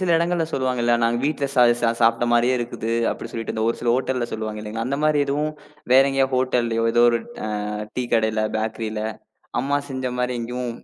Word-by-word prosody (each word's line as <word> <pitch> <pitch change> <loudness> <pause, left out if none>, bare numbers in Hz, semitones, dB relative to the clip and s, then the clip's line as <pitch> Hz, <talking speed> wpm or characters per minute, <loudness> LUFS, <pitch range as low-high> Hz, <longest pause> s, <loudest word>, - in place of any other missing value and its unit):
சில 185 -2 0
இடங்கள்ல 170 0 +1
சொல்லுவாங்க 130 -2 0
இல்ல, 120 0 +3
நாங்க 115 +1 +2
வீட்டில 145 -2 -1
சா 125 - +6 0.2
சா 115 - +4
சாப்ட்ட 115 +1 +3
மாரியே 120 +2 +3
இருக்குது 115 -1 -4 0.2
அப்படி - - -6
சொல்லிட்டு 115 -1 -3
ஒரு 115 - 0
சில 120 - -2
ஹோட்டல்ல 130 -1 -1
சொல்லுவாங்க 110 -1 -4
இல்லைங்களா, 110 +2 -4
அந்த 140 +2 -1
மாரி 155 -1 +3
எதுவும் 150 +2 -1 0.4
வேற 130 +1 +8
எங்கேயா 135 0 +2
ஹோட்டல்லயோ 120 -3 +1
ஏதோ 120 +1 +5
ஒரு, 115 - 0 0.3
ஆ - - -3 0.5
டீ 125 - -1
கடையில, 110 -1 +1 0.2
பேக்கரீல 110 0 -3 0.6
அம்மா 140 +2 +1
செஞ்ச 130 -1 -3
மாரி 125 0 0
எங்கயும் 125 +1 -4
120 Hz, 190 wpm, -22 LUFS, 115-135 Hz, 0.6 s, வேற